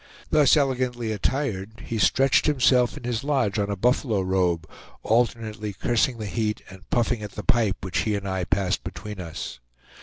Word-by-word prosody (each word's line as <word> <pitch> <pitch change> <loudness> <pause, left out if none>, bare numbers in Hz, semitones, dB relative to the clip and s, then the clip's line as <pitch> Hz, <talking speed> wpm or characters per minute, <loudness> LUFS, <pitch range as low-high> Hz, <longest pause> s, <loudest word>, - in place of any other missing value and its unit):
Thus 150 -1 +5
elegantly 125 -4 0
attired, 110 -2 -2
he 115 - -3
stretched 135 +4 +3
himself 125 -4 +3
in - - -10
his 120 -1 -2
lodge 130 -8 +1
on 100 0 0
a 100 - -1
buffalo 115 0 +1
robe, 90 -3 0 0.4
alternately 110 -2 0
cursing 120 +4 +1
the 110 - -5
heat 105 +1 -2
and 95 -1 -14
puffing 120 -1 +1
at 105 -2 -7
the 105 - -6
pipe 115 -6 +2
which 95 -1 -2
he 105 -2 0
and 100 -1 -4
I 95 -2 -1
passed 95 0 0
between 105 -2 -7
us. 80 -6 -6
110 Hz, 175 wpm, -25 LUFS, 100-125 Hz, 0.4 s, Thus